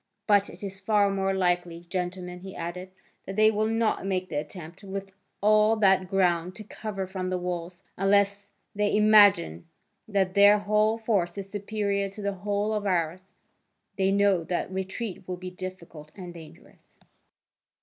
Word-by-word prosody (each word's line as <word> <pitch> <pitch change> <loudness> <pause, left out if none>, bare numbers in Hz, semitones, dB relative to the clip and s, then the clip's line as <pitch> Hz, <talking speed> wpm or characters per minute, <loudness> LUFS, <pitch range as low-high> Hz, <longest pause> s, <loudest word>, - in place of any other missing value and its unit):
But 205 -2 +3
it - - -12
is 195 -1 -6
far 200 0 +2
more 195 0 0
likely, 175 -2 -1
gentlemen," 180 0 -4
he 190 +1 -10
added, 175 +2 -6 0.4
"that 195 - -5
they 215 +1 +5
will 215 0 0
not 225 -2 0
make 185 -1 -2
the 150 - -3
attempt, 160 +5 -7
with 195 0 -6 0.3
all 215 +1 +4
that 190 -3 +3
ground 180 -2 +1
to 215 - -8
cover 210 -2 -5
from 185 -1 -4
the 185 - -1
walls, 180 0 -5
unless 200 +1 +2 0.2
they 205 0 +1
imagine 205 - +5 0.4
that 195 -3 0
their 205 +1 +7
whole 210 +2 +2
force 200 -6 -1
is 195 0 -6
superior 200 -1 -2
to 205 +2 -9
the 200 0 -1
whole 205 +2 -1
of 210 -1 -2
ours: 180 +1 -1 0.6
they 195 0 +1
know 200 -3 +3
that 175 +3 -3
retreat 190 +1 -5
will 180 -1 -4
be 185 0 -7
difficult 175 -4 -9
and 180 -3 -8
dangerous." 165 -2 -15
195 Hz, 160 wpm, -27 LUFS, 180-205 Hz, 0.6 s, their